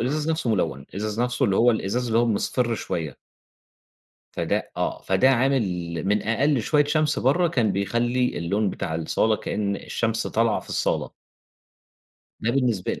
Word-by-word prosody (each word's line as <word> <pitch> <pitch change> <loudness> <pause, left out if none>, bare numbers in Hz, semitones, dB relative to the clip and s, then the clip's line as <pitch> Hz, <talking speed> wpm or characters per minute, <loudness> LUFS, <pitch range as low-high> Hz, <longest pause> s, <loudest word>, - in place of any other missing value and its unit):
الإزاز 150 +6 -1
نَفْسه 160 -7 -1
ملوِّن، 75 - -1
الإزاز 105 +3 -3
نَفْسه 125 0 0
اللي 95 - +2
هو 120 +1 +5
الإزاز 115 +3 -1
اللي 115 0 +2
هو 120 - +3
مصْفِر 115 +2 0
شوية. 80 -9 -4 1.2
فده - - -2
آه - - -2
فده 95 +8 +3
عامل 135 0 +2 0.4
من 105 +1 +2
أقل 130 +4 +1
شوية 150 +3 +3
شمس 155 0 +1
برّه 165 +7 +2
كان 120 -10 +1
بيخلّي 120 +6 0
اللون 100 +4 0
بتاع 80 - -4
الصَّالة 105 +7 +1
كإن 100 -2 -2
الشمس 115 -1 -2
طالعة 115 0 +1
في - - -17
الصَّالة. - - -1 1.3
ده 115 - 0
بالنسبة 120 -7 0
لي. - - -5
115 Hz, 155 wpm, -24 LUFS, 105-130 Hz, 1.3 s, هو